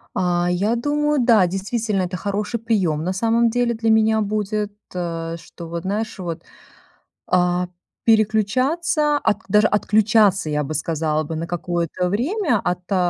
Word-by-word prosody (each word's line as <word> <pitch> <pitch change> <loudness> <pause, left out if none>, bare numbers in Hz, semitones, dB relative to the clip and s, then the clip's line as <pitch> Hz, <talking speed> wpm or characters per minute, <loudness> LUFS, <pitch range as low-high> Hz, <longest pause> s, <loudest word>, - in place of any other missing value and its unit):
А, 175 -1 +1
я 200 +6 +1
думаю, 295 +3 0
да, 220 -7 +5
действительно, 200 +2 -2
это 180 0 -3
хороший 205 +5 -2
прием, 190 -10 0
на 185 +2 -1
самом 230 +4 +2
деле, 240 0 +1
для 225 0 -1
меня 220 0 +3
будет, 210 0 -2 0.2
э, 165 -2 -3
что 165 +1 -11
вот, 170 0 -5
знаешь, 215 +4 -3
вот, 170 -2 -5 0.8
а, 180 0 +1 0.4
переключаться, 260 - +2
отк 215 -1 -1
даже 210 +2 +5
отключаться, 210 -4 +3
я 150 0 0
бы 150 +2 -5
сказала 155 0 -1
бы, 160 +2 -5
на 165 +1 -3
какое-то 175 0 -2
время 260 - 0
от, 180 -1 -1
э, 195 - +3
205 Hz, 150 wpm, -21 LUFS, 175-225 Hz, 0.8 s, да